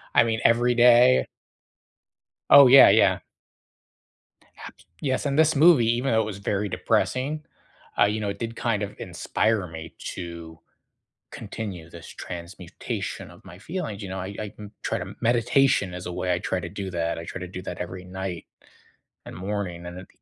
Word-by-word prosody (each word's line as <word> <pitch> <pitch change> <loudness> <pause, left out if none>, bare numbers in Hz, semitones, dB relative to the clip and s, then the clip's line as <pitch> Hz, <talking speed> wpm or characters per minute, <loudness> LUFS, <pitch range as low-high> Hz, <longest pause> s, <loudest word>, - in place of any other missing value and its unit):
I - - +7
mean, 110 -1 -1
every 120 +1 +4
day 125 +1 +5 1.2
Oh, 140 -2 +9
yeah, 135 +2 +9
yeah. - - +4 1.5
Abs - - -16 0.2
Yes, 135 0 -1
and 140 +1 -1
this 160 -1 +4
movie, 145 -7 +5
even 135 +3 -1
though 110 0 +3
it - - -2
was 105 -2 -6
very 100 +1 -2
depressing, 135 +10 -1 0.5
uh, 105 - +7
you 105 +1 -1
know, 100 - -2
it 100 - -6
did 115 0 -4
kind 115 -4 -1
of 100 - -6
inspire 110 -4 -1
me 80 0 -9
to 85 -2 -8 0.7
continue 90 -7 -7
this 85 -1 -12
transmutation 85 0 -7
of - - -17
my 90 - -12
feelings, 110 - -5
you 95 - -6
know, 95 - -5
I 95 +2 -6
I, 105 -1 -6
m 105 0 -9
try - - -1
to - - -7
meditation 120 -3 +2
is 90 0 -7
a 90 - -4
way 90 0 -1
I 90 - -1
try 95 0 -2
to 85 - -6
do 95 0 -6
that, 85 -1 -2
I 85 - -7
try 95 - -7
to 90 - -6
do 90 +1 -8
that - - -6
every 90 +1 -6
night, 95 -2 -6 0.8
and - - -9
morning, 95 -2 -4
and 90 +1 -8
it 95 - -12
100 Hz, 180 wpm, -25 LUFS, 90-120 Hz, 1.5 s, Oh